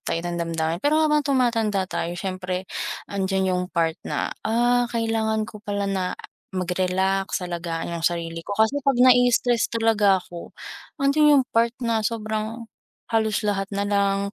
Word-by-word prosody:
tayo 165 - -2
ng 175 0 -3
damdamin. 165 +1 -2
Pero 295 +4 +2
habang 300 -1 +3
tumatanda 230 -8 +1
tayo 175 -2 -4
siyempre 185 0 -4 0.4
andiyan 190 -1 -1
yung 180 0 0
part 165 -3 -1
na, - - -3 0.2
ah 240 +1 +2
kailangan 225 -2 0
ko 210 -1 -11
pala 205 -1 -3
na 190 -2 -2 0.4
mag-relax, 185 +1 0
alagaan 170 -1 -4
yung 165 - +1
sarili 165 -1 -2
ko, 200 - -5
kasi 220 +6 +3
'pag 275 -2 +1
na-i-stress 245 -1 +4
talaga 220 -4 +3
ako, 175 -1 -10 0.4
andiyan 290 +1 +4
yung - - -15
part 230 +1 +2
na 230 -1 +1
sobrang 220 +1 -3 0.5
halos 220 -1 +1
lahat 195 -1 -1
na 200 0 0
lang 200 0 0
205 Hz, 150 wpm, -24 LUFS, 185-230 Hz, 0.5 s, na-i-stress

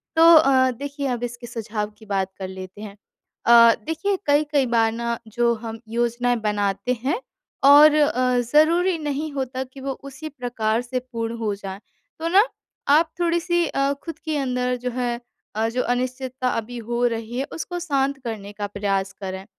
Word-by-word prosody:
तो 320 - +4
अ, 260 -3 +5
देखिए 280 +2 -5
अब 245 -1 -2
इसके 240 0 -5
सुझाव 215 -2 -4
की 220 - -15
बात 195 -2 -1
कर 190 - -4
लेते 190 +2 -9
हैं। 205 -2 -8 0.5
अ, 235 -1 +8
देखिए 350 +5 -1
कई-कई 290 -1 +2
बार 230 -2 +2
ना 235 0 -2
जो 235 +2 +1
हम 225 -1 -6
योजनाएँ 240 +1 0
बनाते 205 +3 0
हैं 285 - 0 0.4
और 290 +2 +8
अ, 255 -4 +2
ज़रूरी 325 +8 +3
नहीं 295 +1 -3
होता 260 -1 -3
कि 265 +1 -13
वो 275 0 -3
उसी 275 +3 -8
प्रकार 240 -4 -1
से 250 +1 -3
पूर्ण 230 -2 -5
हो 215 -3 -1
जाए, 195 -1 -7 0.4
तो 330 - -2
ना 385 +5 +6 0.5
आप 315 +3 +5
थोड़ी-सी 345 0 +1
अ, 275 0 0
खुद 330 - -7
के 310 -2 -1
अंदर 250 -2 0
जो 250 - -2
है 240 -1 -2 0.4
अ, 220 +1 +1
जो 250 +2 -1
अनिश्चितता 255 +1 -2
अभी 235 +1 -3
हो 240 +1 0
रही 230 +1 -4
है 270 - -1
उसको 350 +2 -5
शांत 280 -4 0
करने 215 -4 -5
का 205 0 -4
प्रयास 195 -1 -1
करें। 190 -1 -6
245 Hz, 175 wpm, -23 LUFS, 225-280 Hz, 0.5 s, अ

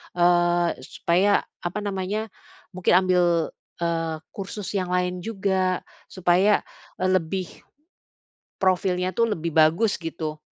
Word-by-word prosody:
eee, 175 -2 +3
supaya 180 +9 +1 0.2
apa 185 +4 -4
namanya 205 +2 -3 0.4
mungkin 185 -1 +2
ambil, 180 -1 +3 0.6
eee, 165 -1 -1 0.2
kursus 200 0 -6
yang 190 -3 -1
lain 180 0 0
juga 190 -3 -1 0.2
supaya, 185 +3 +3 0.3
eee, 185 0 0
lebih, 185 +1 0 1.1
profilnya 185 -1 +1
tuh 230 -1 +2
lebih 165 -1 -4
bagus, 165 +7 +4
gitu. 160 -2 -5
180 Hz, 110 wpm, -24 LUFS, 175-195 Hz, 1.1 s, bagus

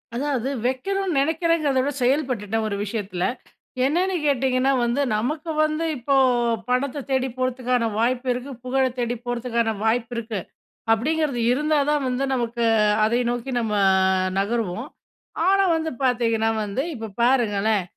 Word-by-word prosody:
அதாவது, 270 -1 -1 0.2
வெக்கணுனு 370 +7 -1
நெனைக்கிறேங்கிறத 320 -2 +1
விட 285 +2 -1
செயல்பட்டுட்டேன், 240 -6 0
ஒரு 200 - -2
விஷயத்தில. 200 -4 -3 0.6
என்னன்னு 360 +6 +1
கேட்டிங்கன்னா 265 -1 +2
வந்து, 240 +4 0 0.2
நமக்கு 305 +8 -2
வந்து 310 +2 0
இப்போ, 275 +3 0 0.5
பணத்த 270 +2 0
தேடி 265 0 +1
போறதுக்கான 250 -2 0
வாய்ப்பு 250 +2 0
இருக்கு. 250 +3 -6
புகழத் 260 -1 0
தேடி 240 0 -1
போறதுக்கான 235 -2 -1
வாய்ப்பு 230 +2 0
இருக்கு. 220 -3 -3 0.5
அப்பிடிங்கிறது 275 +2 +1
இருந்தா 300 +2 +1
தான் 295 -2 +1
வந்து, 255 +2 -1
நமக்கு 235 -1 -1 0.4
அதை 235 +3 +1
நோக்கி 245 +2 -4
நம்ம 220 -2 -2 0.7
நகருவோம். 225 +2 -2 0.6
ஆனா, 390 0 +4
வந்து 320 0 -2
பாத்தீங்கணா, 230 -3 +2
வந்து 210 +7 -2
இப்ப 220 -3 -7
பாருங்களேன்! 220 -5 +2
250 Hz, 125 wpm, -23 LUFS, 230-280 Hz, 0.7 s, ஆனா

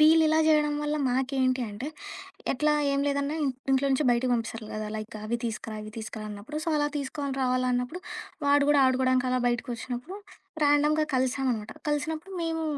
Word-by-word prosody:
వీళ్ళిలా 315 0 +6
జేయడం 300 -1 +4
వల్ల 295 0 0
మాకేంటి 260 0 +1
అంటే, 210 +6 -6 0.7
ఎట్లా 300 +3 +2 0.2
ఏం 275 0 +1
లేదన్న 280 0 0
ఇన్ 275 - +2 0.2
ఇంట్లో 270 +1 +3
నుంచి 270 +3 +2
బయటకి 245 +1 +2
పంపిస్తారు 230 -2 -2
కదా! 215 0 -3
లైక్ 215 0 -7
అవి 230 +2 0
తీసుకురా 220 -1 -4
ఇవి 215 - -8
తీస్కరా 220 -1 -6
అన్నప్పుడు. 210 +9 -7
సో, - - -2
అలా 295 0 +2
తీసుకోని 280 0 -3
రావాలి 255 0 +1
అన్నప్పుడు 250 +8 -1 0.4
వాడు 285 0 +5
కూడా 295 -1 +5
ఆడుకోవడానికి 255 0 +3
అలా 255 - +2
బయటికొచ్చినప్పుడు 245 +5 -3 0.5
ర్యాండమ్‌గా 295 +1 +4
కలిసామనమాట. 255 -4 0 0.2
కలిసినప్పుడు 310 +5 -2
మేము, 325 -1 -1
265 Hz, 160 wpm, -28 LUFS, 245-295 Hz, 0.7 s, వీళ్ళిలా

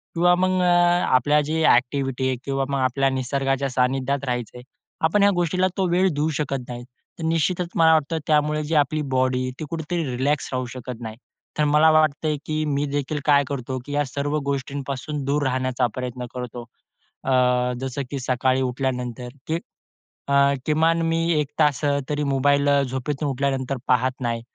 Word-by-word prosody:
किंवा 175 +1 +4
मग 185 0 +1
आपल्या 175 -6 +3
जे 155 +2 -1
एक्टिव्हिटी 130 +1 -1
आहे 130 - 0
किंवा 135 -1 -1
मग 140 -1 -1
आपल्या 135 +1 +1
निसर्गाच्या 135 +1 -1
सानिध्यात 130 +2 0
राहायचं 125 -2 -3
आहे, 125 - -11 0.4
आपण 185 +6 +2
ह्या 200 - +5
गोष्टीला 175 +2 +1
तो 190 -2 +1
वेळ 180 +2 +3
देऊ 150 +2 +1
शकत 135 -3 -2
नाही. 120 0 -6 0.4
तर - - -5
निश्चितच 170 +2 0
मला 160 -1 +5
वाटतं 160 +1 +1
त्यामुळे 150 0 +2
जी 155 +2 -2
आपली 150 +1 +2
बॉडी 130 0 +1
ती 155 - -4
कुठेतरी 165 +1 -3
रिलॅक्स 140 +3 0
राहू 130 0 -1
शकत 125 -1 -7
नाही. 110 -1 -6 0.4
तर 150 - +2
मला 155 +2 +6
वाटतंय, 155 -1 +2
की 155 0 -1
मी 145 -1 0
देखील 145 +1 -2
काय 145 -1 +5
करतो 130 -1 -4
की 145 - -8
या 145 0 +1
सर्व 145 +3 -2
गोष्टींपासून 140 +1 -3
दूर 145 +2 0
राहण्याचा 130 -1 0
प्रयत्न 125 -1 -4
करतो. 125 -1 -6 0.6
अ, 135 - -1 0.5
जसं 135 +1 -3
की 140 - -3
सकाळी 130 +1 +1
उठल्यानंतर, 125 -1 -3 0.2
की 160 +1 -1 0.7
अ, 140 - +3 0.3
किमान 160 +2 +2
मी 165 0 +1 0.2
1 150 - 0
तास 150 -3 +2
अ, 140 0 +2
तरी 150 0 -1
मोबाईल 140 +1 +2
झोपेतून 135 +3 -3
उठल्यानंतर 135 0 -1
पाहत 130 +1 +1
नाही 115 -2 -2
140 Hz, 170 wpm, -23 LUFS, 130-155 Hz, 0.7 s, मला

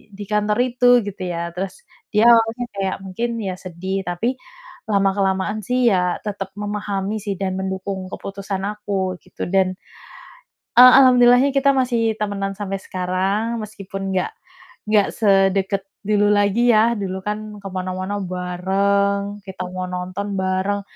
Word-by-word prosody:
di 205 - -7
kantor 210 0 +1
itu 250 0 +1 0.2
gitu 195 -1 -7
ya. 170 0 -3
Terus 195 - -5 0.3
dia 215 +2 +4
awalnya 230 +1 +3
kayak 195 -1 -1
mungkin 210 +6 -3
ya 190 -2 -3
sedih, 185 +2 -4
tapi 230 +9 -1 0.5
lama-kelamaan 195 0 +1
sih 250 +2 +1
ya 180 -1 +1
tetep 195 -2 -5
memahami 205 0 -3
sih 200 -1 -3
dan 190 -1 -2
mendukung 190 0 -4
keputusan 195 -1 -5
aku 200 -3 -2
gitu - - -6
dan, 185 0 +1 1.0
eee, 250 0 +11
alhamdulillahnya 250 +1 +6
kita 275 0 +3
masih 230 -4 +1
temenan 200 -1 -2
sampai 195 -1 -3
sekarang, 195 +5 -1
meskipun 195 -2 -6
nggak 185 - 0 0.6
nggak 210 -2 +4
sedeket 195 -1 +2 0.2
dulu 205 -1 +3
lagi 205 +4 +3
ya. 225 +2 +4
Dulu 190 -2 -3
kan 210 0 -2 0.2
ke 195 - -7
mana-mana 185 +2 -3
bareng, 200 +3 0
kita 185 -1 -6
mau 185 0 -4
nonton 185 +3 -4
bareng, 190 +2 0
200 Hz, 135 wpm, -21 LUFS, 190-210 Hz, 1.0 s, eee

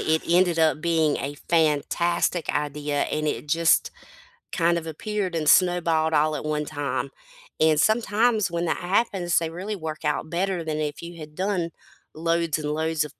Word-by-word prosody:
it 160 0 +1
ended 175 0 +3
up 155 -2 +2
being 160 -3 +2
a 140 +1 -4
fantastic 170 +2 +1
idea 150 0 -1
and 155 0 -2
it 150 - -3
just 165 +2 +3 0.6
kind 170 -1 +2
of 165 -1 -5
appeared 190 +2 -3
and 155 -2 +1
snowballed 165 -3 +3
all 155 +1 +3
at - - -5
one 150 0 -1
time, 145 -2 -3 0.5
and 155 -1 +4
sometimes 220 0 +2
when 170 0 -2
that 165 - 0
happens 185 -2 0
they 165 -1 +1
really 190 +6 -5
work 160 -3 -6
out 150 +1 -1
better 180 0 -1
than 155 -1 -3
if 150 -1 -3
you 170 0 -9
had 150 -1 -10
done 185 -3 -1 0.4
loads 165 0 0
and 150 -1 -3
loads 160 0 0
of 150 - -11
165 Hz, 175 wpm, -24 LUFS, 155-175 Hz, 0.6 s, and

